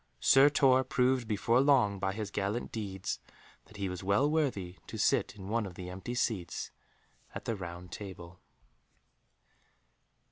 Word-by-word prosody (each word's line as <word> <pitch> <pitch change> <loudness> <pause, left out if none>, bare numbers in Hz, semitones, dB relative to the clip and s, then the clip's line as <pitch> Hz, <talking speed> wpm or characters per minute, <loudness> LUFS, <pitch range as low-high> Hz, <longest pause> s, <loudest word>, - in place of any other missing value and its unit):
Sir 135 +2 +6
Tor 130 -3 +4
proved 125 -2 +1
before 115 +3 +2
long 125 -8 +3
by 95 0 -1
his 105 -1 -5
gallant 100 +4 -2
deeds 95 -4 -4 0.5
that 105 - -15
he 100 -1 -2
was 90 0 -5
well 100 +9 +3
worthy 125 - -1
to 110 - -6
sit 115 +3 +2
in 95 -2 -9
one 110 0 0
of 90 - -10
the 90 0 -7
empty 95 +7 -5
seats 105 -7 -2 0.6
at - - -6
the 115 - -1
Round 90 -1 -8
Table. 90 -3 -9
105 Hz, 150 wpm, -31 LUFS, 95-125 Hz, 0.6 s, Sir